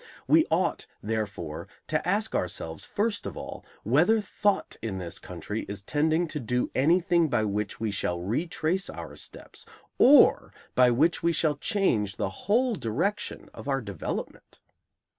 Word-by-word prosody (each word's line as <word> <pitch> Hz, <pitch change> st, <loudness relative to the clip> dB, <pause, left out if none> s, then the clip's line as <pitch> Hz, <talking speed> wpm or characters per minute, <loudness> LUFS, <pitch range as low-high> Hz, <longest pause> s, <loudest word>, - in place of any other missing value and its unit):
We -, -, +5 dB
ought, -, -, 0 dB, 0.2 s
therefore, 100 Hz, -8 st, -3 dB, 0.2 s
to -, -, -1 dB
ask -, -, +1 dB
ourselves, 80 Hz, 0 st, -2 dB
first 210 Hz, 0 st, -1 dB
of -, -, -7 dB
all, -, -, -7 dB, 0.2 s
whether 160 Hz, -, +4 dB
thought 205 Hz, 0 st, 0 dB
in 105 Hz, -4 st, -3 dB
this 85 Hz, -3 st, -5 dB
country 90 Hz, +5 st, -5 dB
is 100 Hz, -1 st, -6 dB
tending 160 Hz, -, +1 dB
to 150 Hz, -, -4 dB
do 125 Hz, 0 st, -1 dB
anything 170 Hz, +3 st, +3 dB
by 120 Hz, -4 st, +1 dB
which 105 Hz, 0 st, -2 dB
we 110 Hz, -1 st, -1 dB
shall 90 Hz, -3 st, -1 dB
retrace 160 Hz, -, -1 dB
our -, -, -8 dB
steps, -, -, -9 dB, 0.4 s
or 285 Hz, +3 st, +6 dB, 0.2 s
by 125 Hz, -1 st, +5 dB
which 150 Hz, +8 st, +2 dB
we 170 Hz, 0 st, +2 dB
shall 155 Hz, -2 st, +1 dB
change 115 Hz, -, +1 dB
the 95 Hz, -, -2 dB, 0.2 s
whole 245 Hz, +3 st, +3 dB
direction 175 Hz, -, -2 dB
of -, -, -10 dB
our 135 Hz, -1 st, +1 dB
development? 100 Hz, -, -6 dB
130 Hz, 150 wpm, -27 LUFS, 105-175 Hz, 0.4 s, or